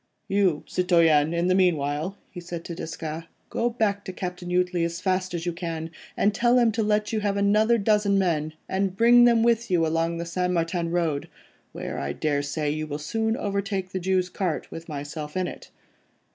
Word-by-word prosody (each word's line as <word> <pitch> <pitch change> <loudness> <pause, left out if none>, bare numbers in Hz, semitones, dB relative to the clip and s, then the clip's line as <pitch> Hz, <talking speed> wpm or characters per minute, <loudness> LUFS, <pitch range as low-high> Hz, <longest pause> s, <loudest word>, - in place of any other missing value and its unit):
"You, 190 -6 +2
citoyen, 165 -4 +3
in 170 +1 0
the 185 - +3
meanwhile," 165 -1 +1
he 180 - -8
said 170 -1 -7
to 170 - -5
Desgas, 160 0 -5 0.3
"go 240 - +1
back 210 -4 0
to - - -4
Captain 180 -1 -5
Jutley 180 -1 +1
as 170 0 -2
fast 185 -1 -1
as 165 0 -4
you 175 - -1
can, 165 -2 -5 0.3
and 205 - +3
tell 240 +3 +3
him 235 -2 +4
to 225 +1 -1
let 210 0 +1
you 220 - +1
have 205 -1 -1
another 215 +3 +3
dozen 205 -1 +2
men, 155 -5 0
and 190 0 -1
bring 240 +2 +7
them 235 -2 +4
with 235 -1 +2
you 175 -3 +3
along 165 +1 0
the 170 - -4
St. 180 +1 -1
Martin 170 0 0
Road, 165 -4 -1 0.4
where - - -5
I 70 0 -3
daresay 145 - -1
you 155 +1 -3
will 145 -1 -4
soon 220 +9 -1
overtake 195 -2 -2
the 190 - -2
Jew's 185 0 +1
cart 180 -4 -3
with 165 +1 -8
myself 150 +2 -5
in 185 - +1
it. - - -8
180 Hz, 195 wpm, -25 LUFS, 165-200 Hz, 0.4 s, bring